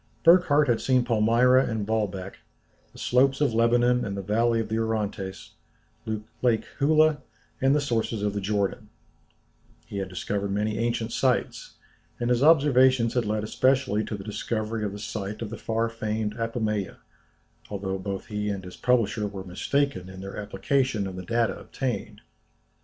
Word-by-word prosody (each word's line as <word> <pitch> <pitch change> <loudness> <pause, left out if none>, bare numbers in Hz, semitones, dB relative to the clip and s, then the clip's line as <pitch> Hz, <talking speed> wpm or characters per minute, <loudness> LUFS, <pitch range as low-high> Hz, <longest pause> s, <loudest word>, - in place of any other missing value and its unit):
Burckhardt 165 -4 +5
had 120 -2 +1
seen 130 -2 +2
Palmyra 120 +3 +4
and 110 -3 -2
Baalbek, 100 -3 -2 0.5
the - - -17
slopes 135 +2 +2
of 145 -6 +2
Lebanon 120 +2 +3
and 100 -2 -4
the 100 - -4
valley 115 +3 +2
of 110 - -2
the 110 +1 -1
Orontes, 105 -5 -3 0.9
Lake 120 -3 +2
Huleh, 155 +1 +4 0.4
and 135 +2 +4
the - - +3
sources 115 -6 -1
of 105 -1 0
the 100 - -3
Jordan; 100 +1 -1 1.0
he 100 - -7
had 95 -1 -4
discovered 100 +2 -3
many 105 +2 -1
ancient 115 -1 -1
sites; 130 -2 -1 0.4
and 120 0 0
his 120 0 +2
observations 130 -6 +5
had 125 -2 +1
led 105 0 -1
especially 130 -1 +1
to 105 - -4
the 95 - -8
discovery 110 +1 -3
of 100 -2 -2
the - - -6
site 105 +1 -5
of 110 - -6
the - - -4
far 115 +1 0
famed 110 -2 -3
Apamoea, 110 -4 -2 0.7
although 95 -1 -3
both 100 0 -4
he 105 -1 -3
and 100 -2 -3
his 90 - -10
publisher 115 -4 +1
were 100 -1 -7
mistaken 95 +2 -1
in 95 0 -10
their 95 0 -7
application 105 +2 -1
of 95 -1 -5
the 95 - -5
data 115 +4 0
obtained. 110 -5 -4
110 Hz, 165 wpm, -26 LUFS, 100-125 Hz, 1.0 s, Burckhardt